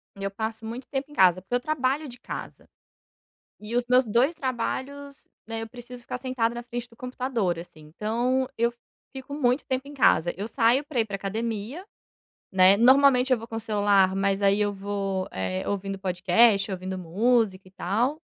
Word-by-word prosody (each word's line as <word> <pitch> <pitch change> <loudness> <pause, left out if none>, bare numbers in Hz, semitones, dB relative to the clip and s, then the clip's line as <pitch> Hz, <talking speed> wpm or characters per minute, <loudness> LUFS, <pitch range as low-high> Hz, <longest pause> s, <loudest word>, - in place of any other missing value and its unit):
Eu 195 0 -3
passo 220 +2 -5
muito 235 +4 -6
tempo 275 +1 -4
em - - -12
casa, 185 -4 +5
porque 195 +6 -3
eu - - +2
trabalho 290 +1 -1
de 245 -2 -11
casa. - - -8 0.9
E 215 +3 -4
os 245 - +2
meus 250 +1 +4
2 245 +9 +2
trabalhos, 275 +2 -4 0.3
né, 225 0 -4
eu 225 - -6
preciso 245 +1 -11
ficar 250 - -5
sentada 245 -3 -1
na 240 - -5
frente 240 0 -6
do 230 - -20
computador, 250 -8 -2
assim. 170 -2 -11
Então, 245 +5 0
eu 235 +1 +1 0.4
fico 265 +1 -8
muito 255 -2 +1
tempo 260 +1 -2
em 290 - -10
casa. 175 - +3
Eu 205 +4 -4
saio 240 +3 +3
pra 280 -4 -1
ir - - +2
pra 205 -2 -5
academia, 220 - -4 0.7
né, 190 +1 +6
normalmente 260 +2 +5
eu 255 - +5
vou 230 0 -9
com 225 - -5
celular, 205 -3 +2
mas 195 0 0
aí 200 +1 +3
eu 205 -1 +1
vou, 195 -1 -3
eh, 95 0 -3
ouvindo 195 -1 -3
podcast, 195 +3 +3
ouvindo 185 0 -4
música 195 +2 +1
e - - -17
tal. 225 - -1
225 Hz, 185 wpm, -26 LUFS, 195-255 Hz, 0.9 s, né